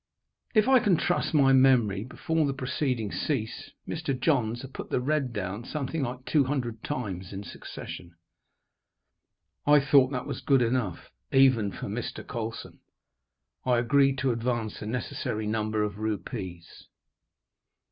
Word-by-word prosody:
If 215 Hz, +1 st, +5 dB
I 265 Hz, -1 st, +7 dB
can 200 Hz, -7 st, +3 dB
trust 175 Hz, -, 0 dB
my 135 Hz, -3 st, +5 dB
memory, 120 Hz, -7 st, +4 dB
before 155 Hz, +5 st, -1 dB
the 135 Hz, -, -2 dB
proceedings 125 Hz, -5 st, -2 dB
ceased, 120 Hz, -6 st, -3 dB
Mr. 150 Hz, -5 st, -2 dB
Johns 120 Hz, -6 st, +1 dB
had 135 Hz, 0 st, -9 dB
put -, -, -7 dB
the -, -, +1 dB
red 140 Hz, 0 st, 0 dB
down 105 Hz, 0 st, -4 dB
something 150 Hz, +3 st, -3 dB
like 125 Hz, 0 st, -4 dB
two 145 Hz, -4 st, +3 dB
hundred 125 Hz, -5 st, -3 dB
times 95 Hz, -10 st, -4 dB
in 100 Hz, 0 st, -6 dB
succession. 85 Hz, -1 st, -9 dB, 1.5 s
I 150 Hz, 0 st, +7 dB
thought 140 Hz, -1 st, +5 dB
that 125 Hz, -2 st, -3 dB
was -, -, -5 dB
good 135 Hz, -3 st, +4 dB
enough, 115 Hz, -7 st, -2 dB, 0.2 s
even 130 Hz, -7 st, +4 dB
for -, -, -6 dB
Mr. -, -, -5 dB
Colson. 115 Hz, 0 st, -6 dB, 0.8 s
I 125 Hz, -1 st, +3 dB
agreed 135 Hz, +3 st, +3 dB
to 135 Hz, -1 st, +1 dB
advance 115 Hz, -2 st, -2 dB
the 105 Hz, -, -6 dB
necessary 110 Hz, -2 st, -3 dB
number 110 Hz, 0 st, 0 dB
of 105 Hz, -1 st, -3 dB
rupees. 95 Hz, -4 st, -5 dB
125 Hz, 145 wpm, -28 LUFS, 110-135 Hz, 1.5 s, I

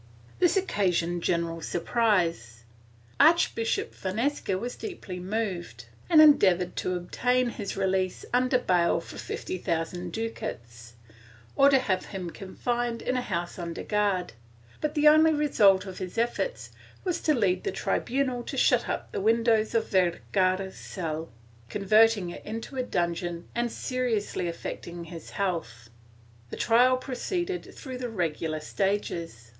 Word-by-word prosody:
This 360 Hz, +2 st, +4 dB
occasioned 175 Hz, -, 0 dB
general 170 Hz, -1 st, -1 dB
surprise. 170 Hz, -, 0 dB, 0.6 s
Archbishop 310 Hz, -7 st, +3 dB
Fonseca 215 Hz, +1 st, -1 dB
was 240 Hz, +5 st, -4 dB
deeply 275 Hz, -, -7 dB
moved 180 Hz, -, -3 dB, 0.2 s
and 325 Hz, -3 st, +7 dB
endeavored 185 Hz, -, +5 dB
to 185 Hz, -, -1 dB
obtain 245 Hz, +8 st, 0 dB
his 205 Hz, -5 st, -5 dB
release 190 Hz, -1 st, 0 dB
under 255 Hz, +1 st, +3 dB
bail 175 Hz, -8 st, +2 dB
for 165 Hz, -, -10 dB
fifty 185 Hz, -, -5 dB
thousand 170 Hz, +1 st, -2 dB
ducats, 120 Hz, -, -6 dB, 0.6 s
or 275 Hz, 0 st, +6 dB
to 275 Hz, -, +5 dB
have 205 Hz, -8 st, 0 dB
him 185 Hz, -4 st, -6 dB
confined 235 Hz, +5 st, -3 dB
in 255 Hz, -, -1 dB
a 250 Hz, -, +1 dB
house 175 Hz, -5 st, -4 dB
under 170 Hz, -1 st, -5 dB
guard, 200 Hz, -, 0 dB, 0.5 s
but 305 Hz, +1 st, -1 dB
the 300 Hz, 0 st, +4 dB
only 310 Hz, +1 st, +7 dB
result 210 Hz, -11 st, +4 dB
of 190 Hz, -2 st, -8 dB
his 185 Hz, +3 st, -6 dB
efforts 240 Hz, -, -1 dB, 0.3 s
was 355 Hz, -3 st, -1 dB
to 305 Hz, -, +2 dB
lead 185 Hz, -6 st, +1 dB
the -, -, -1 dB
tribunal 255 Hz, +5 st, -1 dB
to -, -, -6 dB
shut -, -, +3 dB
up -, -, -3 dB
the -, -, -3 dB
windows 225 Hz, +1 st, +2 dB
of 225 Hz, -, +1 dB
Vergara's 185 Hz, +1 st, +1 dB
cell, 160 Hz, -2 st, -5 dB, 0.4 s
converting 210 Hz, -, +3 dB
it -, -, -9 dB
into 225 Hz, +5 st, -6 dB
a 260 Hz, -, 0 dB
dungeon 175 Hz, -5 st, -2 dB
and 240 Hz, 0 st, -1 dB
seriously 230 Hz, -9 st, -2 dB
affecting 170 Hz, 0 st, -6 dB
his 165 Hz, -1 st, -9 dB
health. 160 Hz, -, -3 dB, 0.6 s
The -, -, -7 dB
trial 250 Hz, +3 st, +4 dB
proceeded 345 Hz, +8 st, -4 dB
through 260 Hz, -3 st, -7 dB
the 245 Hz, -1 st, -3 dB
regular 160 Hz, -5 st, -2 dB
stages. 170 Hz, -, -2 dB
195 Hz, 140 wpm, -27 LUFS, 175-245 Hz, 0.6 s, and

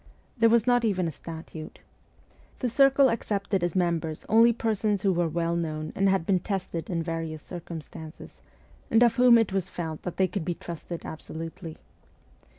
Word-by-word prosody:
There 230 Hz, -3 st, +4 dB
was 230 Hz, -1 st, +4 dB
not 245 Hz, -1 st, +3 dB
even 190 Hz, -6 st, +1 dB
a -, -, -2 dB
statute. 160 Hz, +1 st, -9 dB, 0.8 s
The 250 Hz, -, -1 dB
circle 275 Hz, +2 st, +5 dB
accepted 200 Hz, -4 st, -1 dB
as 175 Hz, 0 st, -1 dB
members 170 Hz, -3 st, -1 dB
only 230 Hz, +2 st, +6 dB
persons 215 Hz, -3 st, -1 dB
who 195 Hz, -2 st, +3 dB
were 175 Hz, -1 st, +1 dB
well 170 Hz, +1 st, -1 dB
known 155 Hz, -2 st, -3 dB
and 195 Hz, 0 st, +3 dB
had 190 Hz, -4 st, +1 dB
been 190 Hz, 0 st, +2 dB
tested 180 Hz, -3 st, -4 dB
in 170 Hz, -3 st, -1 dB
various 165 Hz, -2 st, -4 dB
circumstances, 160 Hz, -2 st, -9 dB, 0.5 s
and 225 Hz, +2 st, +5 dB
of 240 Hz, +1 st, +3 dB
whom 245 Hz, -1 st, +7 dB
it 225 Hz, -4 st, +1 dB
was 190 Hz, -1 st, -1 dB
felt 160 Hz, -3 st, -5 dB
that 180 Hz, -, -6 dB
they 190 Hz, -, +3 dB
could 180 Hz, 0 st, -4 dB
be 175 Hz, +1 st, -2 dB
trusted 170 Hz, 0 st, -7 dB
absolutely. 165 Hz, +1 st, -7 dB
180 Hz, 170 wpm, -27 LUFS, 165-215 Hz, 0.8 s, whom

